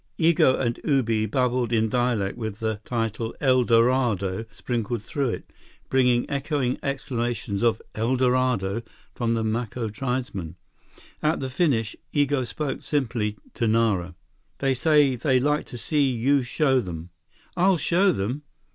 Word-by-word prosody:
Igo 160 -5 +4
and 120 -2 -1
Ubi 115 -7 +1
babbled 125 0 0
in 110 -1 +2
dialect 120 -4 0
with 110 -4 -5
the 110 -2 -2
title 115 -1 -2
"El 130 -3 +4
Dorado" 115 -4 +2
sprinkled 115 -1 -3
through 140 +2 -1
it, - - -6 0.4
bringing 125 -2 +3
echoing 140 -3 -1
exclamations 120 -6 -2
of 115 -2 +2
"El 115 +4 0
Dorado" 125 -5 +1 0.3
from 115 -1 0
the 115 - -1
Maco 115 +1 -2
tribesmen. 120 - -3 0.7
At 155 +2 +1
the 130 - -3
finish, 125 -7 +1 0.2
Igo 145 -3 +1
spoke 150 0 -3
simply 115 -7 -1 0.2
to 115 - 0
Nara: 105 -6 +1 0.4
"They 135 -1 +1
say 145 0 +3
they 130 +1 +2
like 150 +3 0
to 120 - -8
see 145 +2 +1
you 130 +3 +2
show 130 +1 +2
them." 85 -5 -6 0.4
"I'll 185 +1 +4
show 185 +5 +3
them!" 125 - -2
125 Hz, 140 wpm, -25 LUFS, 110-135 Hz, 0.7 s, Igo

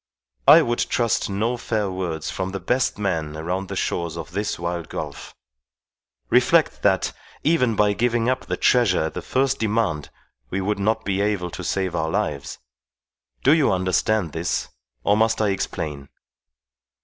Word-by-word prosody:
I - - +9
would 120 0 -1
trust 115 -4 0
no 110 +5 -1
fair 105 -4 -1
words 85 -4 -3
from 95 0 -3
the 100 - -3
best 125 +8 0
man 80 -7 -2
around 90 +4 -3
the - - -5
shores 85 -1 -2
of 85 - -7
this 105 +1 -2
wild 85 -1 -4
gulf. - - -6 1.0
Reflect - - +3
that, - - +2 0.3
even 125 -8 +2
by 105 0 +3
giving 120 +1 +1
up 130 0 -1
the - - -2
treasure 115 -10 +3
at 80 - -3
the - - -4
first 135 +1 0
demand, 105 -9 0 0.4
we 95 - -2
would 100 +1 -1
not 110 +2 0
be 100 0 0
able 100 -4 -1
to - - -6
save 95 -2 -1
our 80 - 0
lives. 70 -3 -2 0.9
Do 140 - +6
you 155 -4 +3
understand 95 0 +1
this, 80 +3 -2 0.3
or 105 - +3
must 110 +1 +2
I 105 -2 +2
explain?" 75 -7 -3
100 Hz, 160 wpm, -23 LUFS, 85-115 Hz, 1.0 s, I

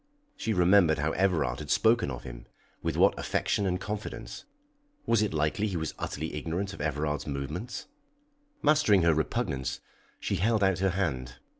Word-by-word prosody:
She 115 - -2
remembered 90 -3 +5
how 75 +2 0
Everard 80 -11 +1
had 75 -1 -7
spoken 115 -7 +3
of 60 -2 -6
him, - - -9 0.3
with - - -2
what - - +5
affection 100 - 0
and 90 0 0
confidence! 110 - -6 0.6
Was 115 -2 +3
it 105 - +1
likely 75 +7 0
he 95 -4 -2
was 80 -2 -3
utterly 80 +2 -4
ignorant 85 +6 -3
of 100 - -8
Everard's 75 0 -1
movements? 75 - -4 0.8
Mastering 145 - +4
her 85 -1 +5
repugnance, 70 -4 -1 0.4
she - - -1
held 110 +1 +2
out 95 -2 +2
her 95 0 +2
hand. 70 -10 -2
85 Hz, 160 wpm, -29 LUFS, 75-100 Hz, 0.8 s, remembered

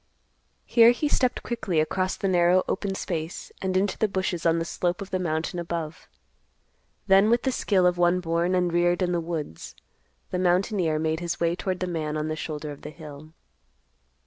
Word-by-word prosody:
Here 230 -1 +6
he 245 +5 +1
stepped 255 -3 +1
quickly 215 -9 -1
across 185 +4 0
the 195 - -1
narrow 180 0 +4
open 195 0 -2
space 165 -3 -4
and 185 -1 0
into 195 +1 0
the 215 - +3
bushes 185 -3 -1
on 165 0 +3
the 165 - -1
slope 175 +1 -1
of 200 0 -7
the 185 - 0
mountain 165 0 -2
above. 170 -1 -5 1.0
Then 195 +2 +5
with 235 +1 +3
the 265 - +1
skill 195 -6 +2
of 180 0 +2
one 175 +1 +3
born 170 +1 0
and 180 -2 +1
reared 175 +1 +2
in 180 - 0
the 175 -1 0
woods, 160 - -6 0.6
the 180 - -1
mountaineer 180 -2 +1
made 160 0 -1
his 175 -1 -3
way 170 0 +1
toward 185 0 -3
the - - +1
man 155 -4 -3
on 155 +1 -2
the 155 - -2
shoulder 150 -1 -5
of 145 - -10
the 150 - -7
hill. 155 0 -11
175 Hz, 195 wpm, -26 LUFS, 165-190 Hz, 1.0 s, Here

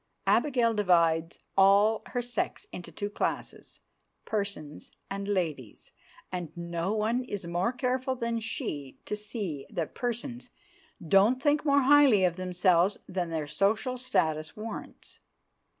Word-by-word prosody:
Abigail 245 -6 +3
divides 170 -5 +2 0.2
all 200 +3 +5
her 245 -1 -2
sex 240 -2 -3
into 175 - -8
two 205 - -4
classes, - - -4 0.4
"persons" 200 -8 -4 0.2
and 200 0 -4
"ladies," 160 - -3 0.4
and 175 -3 -4
no 170 +2 -2
one 220 +4 0
is 205 -7 -5
more 175 +6 0
careful 255 +1 -1
than 235 -1 -2
she 145 -11 -5
to - - -2
see 205 - -5
that 165 -3 -3
"persons" 245 +1 -4 0.6
don't 200 +9 +5
think 290 +2 +2
more 285 -2 +4
highly 275 -7 +6
of 175 -2 +1
themselves 180 +1 +2
than 180 -2 -2
their 160 -2 -2
social 205 - 0
status 160 -12 -1
warrants. 220 +1 -8
200 Hz, 130 wpm, -29 LUFS, 170-240 Hz, 0.6 s, highly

